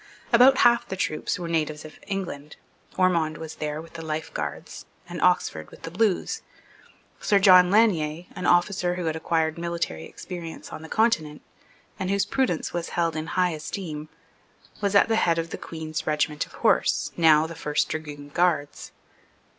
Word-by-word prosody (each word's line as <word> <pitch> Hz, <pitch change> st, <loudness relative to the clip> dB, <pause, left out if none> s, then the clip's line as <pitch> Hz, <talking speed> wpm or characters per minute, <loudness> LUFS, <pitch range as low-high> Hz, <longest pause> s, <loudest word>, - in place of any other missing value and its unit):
About 255 Hz, +3 st, +7 dB
half 240 Hz, 0 st, +4 dB
the 190 Hz, -, -4 dB
troops 155 Hz, -4 st, -2 dB
were 175 Hz, -2 st, -5 dB
natives 155 Hz, -2 st, -2 dB
of 155 Hz, -, -12 dB
England. 175 Hz, -7 st, -5 dB, 0.4 s
Ormond 170 Hz, -4 st, +2 dB
was 160 Hz, -1 st, -8 dB
there 150 Hz, 0 st, -3 dB
with 165 Hz, +1 st, -11 dB
the 165 Hz, -, -7 dB
Life 155 Hz, 0 st, -4 dB
Guards, -, -, -5 dB, 0.2 s
and -, -, -6 dB
Oxford 80 Hz, -1 st, +1 dB
with -, -, -16 dB
the 165 Hz, -, -6 dB
Blues. 200 Hz, 0 st, 0 dB, 0.8 s
Sir 205 Hz, -, +3 dB
John 185 Hz, -2 st, +7 dB
Lanier, 175 Hz, -6 st, +2 dB
an 180 Hz, -, -3 dB
officer 175 Hz, 0 st, +2 dB
who 180 Hz, -1 st, -4 dB
had 160 Hz, -1 st, -1 dB
acquired 160 Hz, 0 st, 0 dB
military 170 Hz, -, -3 dB
experience 170 Hz, -, -8 dB
on -, -, -7 dB
the 160 Hz, -, -10 dB
Continent, 160 Hz, -10 st, +1 dB, 0.6 s
and 185 Hz, -, -2 dB
whose 200 Hz, 0 st, +1 dB
prudence 255 Hz, -12 st, -1 dB
was 175 Hz, -1 st, -3 dB
held 165 Hz, -2 st, 0 dB
in 155 Hz, 0 st, -4 dB
high 180 Hz, 0 st, +1 dB
esteem, 155 Hz, -1 st, -6 dB, 0.7 s
was 200 Hz, -1 st, 0 dB
at 200 Hz, -, +6 dB
the 225 Hz, -1 st, +1 dB
head 170 Hz, -5 st, +2 dB
of 165 Hz, 0 st, -3 dB
the -, -, -4 dB
Queen's 160 Hz, -1 st, -6 dB
regiment 150 Hz, -1 st, 0 dB
of -, -, -20 dB
horse, -, -, +2 dB
now 160 Hz, -2 st, +5 dB
the 165 Hz, -, -6 dB
First 150 Hz, -2 st, -1 dB
Dragoon 145 Hz, -2 st, -6 dB
Guards. 160 Hz, -2 st, 0 dB
165 Hz, 170 wpm, -25 LUFS, 155-185 Hz, 0.8 s, About